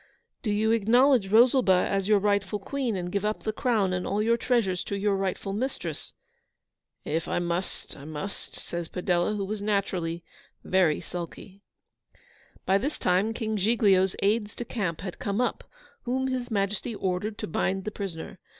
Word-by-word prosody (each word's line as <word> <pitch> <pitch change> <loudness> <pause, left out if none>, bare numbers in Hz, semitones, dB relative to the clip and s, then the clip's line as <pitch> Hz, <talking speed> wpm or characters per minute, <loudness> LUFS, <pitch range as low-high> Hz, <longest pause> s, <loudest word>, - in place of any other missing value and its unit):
'Do 225 - -2
you 215 +2 +2
acknowledge 235 +1 +4
Rosalba 225 -4 +5
as 195 -1 0
your 210 -1 +5
rightful 200 0 +1
Queen, 245 +2 -2
and 175 -1 -3
give 200 +1 -1
up 215 +1 -1
the 215 - -1
crown 215 -6 +1
and 180 0 -2
all 205 - 0
your 230 +2 +3
treasures 230 -7 +1
to 200 - -3
your 200 0 +1
rightful 195 0 -2
mistress?' 255 +7 -3 0.9
'If 160 +2 -1
I - - 0
must, 175 +1 -3
I 140 - -11
must,' 155 +6 -6
says 170 -1 -5
Padella, 180 +2 0
who 200 -1 -2
was 210 +1 -4
naturally 185 -5 -1 0.4
very 180 -5 +2
sulky. 180 +3 -7 1.0
By 195 +1 +4
this 285 +8 -2
time 185 +5 +2
King 220 -1 -2
Giglio's 195 -3 +3
aides 210 +1 +1
de 240 - -5
camp 185 -10 -2
had 185 -2 -6
come 200 +2 -1
up, 250 - 0 0.4
whom 260 +2 -1
His 255 -1 -2
Majesty 210 +2 -1
ordered 195 +3 -2
to - - -4
bind 190 +4 -1
the 215 - -2
prisoner. 190 -2 -6
200 Hz, 170 wpm, -27 LUFS, 185-220 Hz, 1.0 s, Rosalba